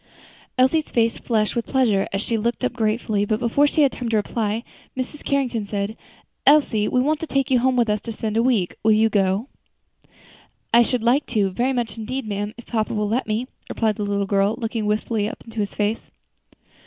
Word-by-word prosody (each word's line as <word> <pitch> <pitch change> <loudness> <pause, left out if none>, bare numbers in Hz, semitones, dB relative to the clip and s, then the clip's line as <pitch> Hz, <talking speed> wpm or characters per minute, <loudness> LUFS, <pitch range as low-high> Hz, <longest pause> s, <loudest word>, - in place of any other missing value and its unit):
Elsie's 280 +5 +3
face 230 -1 +1
flushed 215 -2 0
with 235 - -2
pleasure, 230 -8 +2
and 195 - -1
she 230 +3 -1
looked 235 +3 -1
up 250 - -1
gratefully; 215 -2 0
but 215 +1 0
before 250 +5 +3
she 305 +1 +2
had 275 - +4
time 245 -2 -4
to 225 - +2
reply, 215 +1 -1 0.3
Mrs. 260 +3 -5
Carrington 250 -7 -1
said, 200 +1 -3 0.5
"Elsie, 270 -8 +4
we 255 - +1
want 295 +4 +1
to 325 - -5
take 275 -2 0
you 255 - +5
home 260 +1 +2
with 240 -2 +3
us 210 -1 0
to 230 - -6
spend 220 -1 -3
a 225 - +3
week; 230 -8 +1
will 220 0 +4
you 220 +1 +4
go?" 200 +3 +1 1.3
"I 235 - +8
should 240 0 +1
like 255 +5 +2
to, 205 -5 +1
very 245 +7 0
much, 235 -3 -2
indeed, 255 +4 -4
ma'am, 205 0 -3
if 240 - -11
papa 220 -1 -1
will 210 0 0
let 240 +3 0
me," 220 +3 -1 0.2
replied 220 -2 0
the 210 - -2
little 200 0 0
girl, 200 +2 +2
looking 225 -3 -2
wistfully 210 0 0
up - - -10
into 225 -1 -7
his 205 -1 -2
face. 210 +2 -1
225 Hz, 210 wpm, -22 LUFS, 210-250 Hz, 1.3 s, I